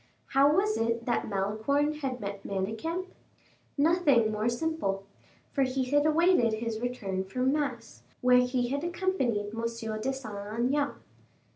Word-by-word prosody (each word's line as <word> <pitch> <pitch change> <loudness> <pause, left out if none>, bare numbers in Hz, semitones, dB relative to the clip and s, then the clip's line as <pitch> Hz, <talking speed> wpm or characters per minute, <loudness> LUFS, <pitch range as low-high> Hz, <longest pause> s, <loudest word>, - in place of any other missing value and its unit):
How 275 +2 +5
was 410 +7 +2
it 230 +1 0
that 240 - 0
Malicorne 220 +10 0
had 260 -4 -3
met 200 -1 -5
Manicamp? 225 - -3 0.7
Nothing 285 -8 +4
more 215 +2 0
simple, 240 -7 -2 0.5
for 275 - 0
he 260 0 +1
had 290 +1 +4
awaited 310 -7 +4
his 220 0 -3
return 215 -6 -2
from 255 +7 0
mass, 295 -1 -3 0.2
where 250 0 +6
he 250 -1 +1
had 280 +3 -2
accompanied 340 - -1
M. 225 - -4
de 230 - +1 0.4
Saint 215 -5 -6
Aignan. 275 +5 +1
250 Hz, 140 wpm, -29 LUFS, 220-290 Hz, 0.7 s, where